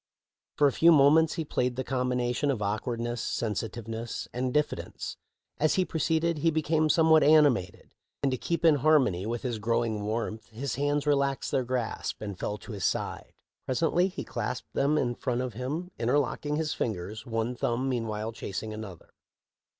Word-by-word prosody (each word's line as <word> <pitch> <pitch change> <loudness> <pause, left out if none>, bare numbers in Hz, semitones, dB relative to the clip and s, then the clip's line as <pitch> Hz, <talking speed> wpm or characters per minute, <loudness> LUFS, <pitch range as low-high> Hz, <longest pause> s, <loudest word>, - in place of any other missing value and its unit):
For 145 - +5
a 140 - +5
few 165 +5 +5
moments 155 +2 +5
he 160 - -3
played 125 -3 -1
the 130 - -2
combination^ 125 +1 0
of 125 - -2
awkwardness, 115 +3 -2
sensitiveness, 115 +1 -3
and 125 +1 -1
diffidence. 150 +2 -2 0.4
As 155 +1 +3
he 185 - +2
proceeded 160 0 0
he 165 - +3
became 155 0 +1
somewhat 160 0 +5
animated, 145 - +3 0.3
and 140 - +2
to 130 - -1
keep 170 0 -1
in 155 -3 +6
harmony 130 - +3
with 115 0 -3
his 120 -4 -2
growing 115 -1 0
warmth 110 +1 -3
his 125 +4 -4
hands 145 +2 0
relaxed 140 -2 +1
their 135 -2 +1
grasp 125 -2 -3
and 100 -3 -6
fell 105 - -2
to 110 - -11
his 100 -3 -5
side. - - -2 0.3
Presently 165 +6 +2
he 190 - -6
clasped 125 +4 -4
them 145 +2 +2
in 120 -4 +1
front 120 0 -2
of 125 -2 -3
him, 145 - -4
interlocking 145 +4 0
his 155 -1 -1
fingers, 110 +1 -4
one 115 +1 -1
thumb 120 +2 -1
meanwhile 115 -3 -2
chasing 110 0 -5
another. 105 -5 -9
125 Hz, 165 wpm, -28 LUFS, 115-150 Hz, 0.4 s, in